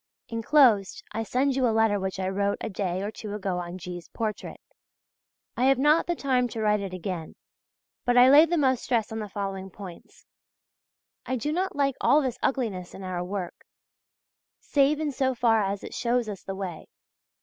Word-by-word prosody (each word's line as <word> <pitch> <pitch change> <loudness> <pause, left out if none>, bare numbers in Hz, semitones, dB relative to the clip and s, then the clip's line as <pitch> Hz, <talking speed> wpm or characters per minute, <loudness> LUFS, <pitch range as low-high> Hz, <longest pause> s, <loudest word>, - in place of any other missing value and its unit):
Inclosed 230 -4 +3
I 220 - -3
send 260 +4 0
you 260 -2 +2
a - - +2
letter 220 -2 +2
which 190 0 -4
I 185 - -1
wrote 200 +1 0
a - - -4
day 185 -1 -2
or 205 - -3
two 210 -1 -7
ago 190 -3 -2
on 175 +1 -6
G.'s 175 -1 -8
portrait. 215 -2 -5 1.0
I 250 - +1
have 270 0 +5
not 295 +4 +3
the 345 - 0
time 255 -4 +1
to 230 - -7
write 210 -1 +2
it 195 -2 -5
again; 180 -3 -5 0.7
but 245 -2 +2
I 250 +1 +8
lay 295 +5 +8
the 345 +1 0
most 260 -4 +2
stress 230 -4 0
on 220 - -4
the 210 -1 -5
following 195 -1 -4
points: 185 -2 -12 1.0
I 260 - 0
do 275 +5 -2
not 375 +3 -1
like 275 -2 +1
all 295 - +5
this 260 -5 -2
ugliness 215 -10 -2
in 190 - -9
our 180 -1 -3
work, 185 -1 -6 0.9
save 290 +1 +2
in 305 -2 -1
so 260 -1 0
far 225 -2 +3
as 200 0 -2
it - - -8
shows 240 -1 0
us 200 -3 -6
the 195 - -6
way. 185 -4 -6
220 Hz, 195 wpm, -26 LUFS, 195-260 Hz, 1.0 s, I